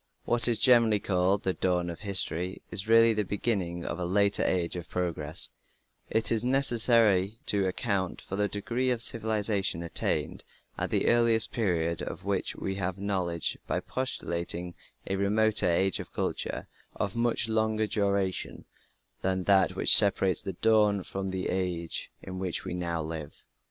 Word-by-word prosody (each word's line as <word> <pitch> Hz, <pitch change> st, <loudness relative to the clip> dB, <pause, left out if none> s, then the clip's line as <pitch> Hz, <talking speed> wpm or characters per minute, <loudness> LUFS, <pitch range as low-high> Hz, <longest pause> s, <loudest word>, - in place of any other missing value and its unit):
What 120 Hz, -1 st, +4 dB
is 120 Hz, -2 st, +3 dB
generally 115 Hz, -4 st, +4 dB
called 95 Hz, +1 st, 0 dB
the 95 Hz, -, 0 dB
"Dawn 90 Hz, -2 st, -1 dB
of 85 Hz, -, -10 dB
History" 95 Hz, -3 st, -1 dB
is 100 Hz, +2 st, -3 dB
really 115 Hz, 0 st, +5 dB
the 105 Hz, -1 st, -1 dB
beginning 95 Hz, -4 st, -2 dB
of 85 Hz, -, -4 dB
a -, -, -3 dB
later 100 Hz, +3 st, +2 dB
age 90 Hz, -2 st, -1 dB
of 90 Hz, -1 st, -7 dB
progress; 85 Hz, -3 st, +2 dB, 0.6 s
it 110 Hz, 0 st, +1 dB
is 115 Hz, -1 st, +2 dB
necessary 115 Hz, -6 st, +3 dB
to 100 Hz, -2 st, +1 dB
account 95 Hz, -1 st, -2 dB
for 95 Hz, -, -7 dB
the 105 Hz, +1 st, +1 dB
degree 120 Hz, +6 st, -2 dB
of 120 Hz, -2 st, 0 dB
civilization 105 Hz, -6 st, 0 dB
attained 85 Hz, -, -2 dB, 0.3 s
at -, -, -3 dB
the -, -, 0 dB
earliest 115 Hz, -3 st, +4 dB
period 85 Hz, -7 st, -1 dB
of -, -, -7 dB
which -, -, -2 dB
we 95 Hz, -, -4 dB
have 95 Hz, -1 st, -3 dB
knowledge 95 Hz, -4 st, -2 dB
by -, -, -1 dB
postulating 90 Hz, -8 st, -3 dB, 0.3 s
a 95 Hz, -, -2 dB
remoter 105 Hz, 0 st, +2 dB
age 95 Hz, +2 st, +1 dB
of -, -, -8 dB
culture -, -, -4 dB, 0.3 s
of 100 Hz, -, -3 dB
much 115 Hz, -1 st, +1 dB
longer 110 Hz, 0 st, 0 dB
duration 100 Hz, -3 st, -2 dB, 0.6 s
than 95 Hz, 0 st, -1 dB
that 95 Hz, -1 st, +3 dB
which -, -, +7 dB
separates 95 Hz, -2 st, +4 dB
the 95 Hz, -, -5 dB
"Dawn" 105 Hz, -3 st, +2 dB
from 95 Hz, +1 st, -5 dB
the 95 Hz, 0 st, -3 dB
age 90 Hz, -3 st, -3 dB
in 95 Hz, 0 st, -7 dB
which 95 Hz, -2 st, -3 dB
we -, -, -5 dB
now 85 Hz, -2 st, -3 dB
live. 80 Hz, -2 st, -8 dB
95 Hz, 160 wpm, -28 LUFS, 90-110 Hz, 0.6 s, which